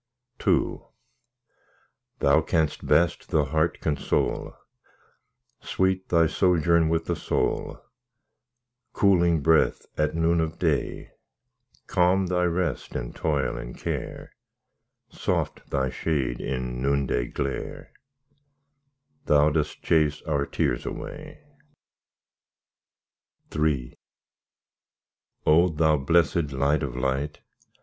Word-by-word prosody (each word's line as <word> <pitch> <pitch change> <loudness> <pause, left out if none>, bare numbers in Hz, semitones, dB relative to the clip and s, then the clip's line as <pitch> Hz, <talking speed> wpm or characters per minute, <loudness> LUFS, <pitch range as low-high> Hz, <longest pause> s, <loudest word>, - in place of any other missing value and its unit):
II - - +2 1.4
Thou - - +4
canst 80 -2 -1
best 85 0 +2
the 75 -2 +2
heart 80 +4 0
console; 75 -2 -1 1.0
Sweet 95 0 -1
Thy 85 -1 +4
sojourn 85 -1 +3
with 80 0 0
the - - -1
soul— - - -2 1.1
Cooling 85 -5 +3
breath 80 +2 +3
at 75 0 +1
noon 85 0 +2
of 80 0 -3
day, 80 -5 -1 0.7
Calm 90 +2 +2
Thy 90 0 +1
rest 85 -5 -2
in - - -4
toil 70 -5 -1
and - - -8
care, - - -5 0.8
Soft - - -3
Thy 65 -2 0
shade 65 -7 -2
in 65 -1 -3
noontide 70 -3 0
glare— 70 -1 -4 1.4
Thou 75 +1 +4
dost 75 -1 -2
chase 75 -2 +2
our 70 -4 -1
tears - - -1
away. - - -8 2.1
III 75 -5 0 1.5
O! 85 +4 +5
Thou 80 -1 +2
blessed 80 +1 +1
Light 70 +3 +1
of 65 -5 -4
light! 70 +3 -2
80 Hz, 95 wpm, -25 LUFS, 70-85 Hz, 2.1 s, O